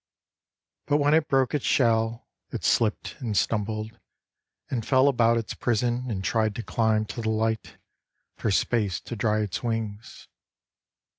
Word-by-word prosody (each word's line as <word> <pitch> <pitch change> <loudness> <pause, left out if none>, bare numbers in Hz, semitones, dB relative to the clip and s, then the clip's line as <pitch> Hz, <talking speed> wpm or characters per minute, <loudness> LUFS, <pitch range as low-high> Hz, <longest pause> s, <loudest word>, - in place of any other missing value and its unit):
But 145 - +3
when 145 0 +3
it 160 -1 +3
broke 135 -2 +2
its 150 - 0
shell 115 -2 +1 0.2
It - - -6
slipped 110 -2 +1
and 115 -7 -2
stumbled 110 +2 -1 0.7
and 120 -4 -2
fell 130 +3 +4
about 115 -4 +3
its 115 - -3
prison 120 +1 0
And 95 -4 -3
tried 110 -1 +1
to 115 - -4
climb 110 -2 +1
to 115 - -6
the 110 - -1
light 110 0 -1 0.6
For - - -2
space 100 -2 +1
to 120 - -7
dry 110 0 +1
its 105 -4 -3
wings. 115 -2 -4
115 Hz, 150 wpm, -26 LUFS, 110-120 Hz, 0.7 s, fell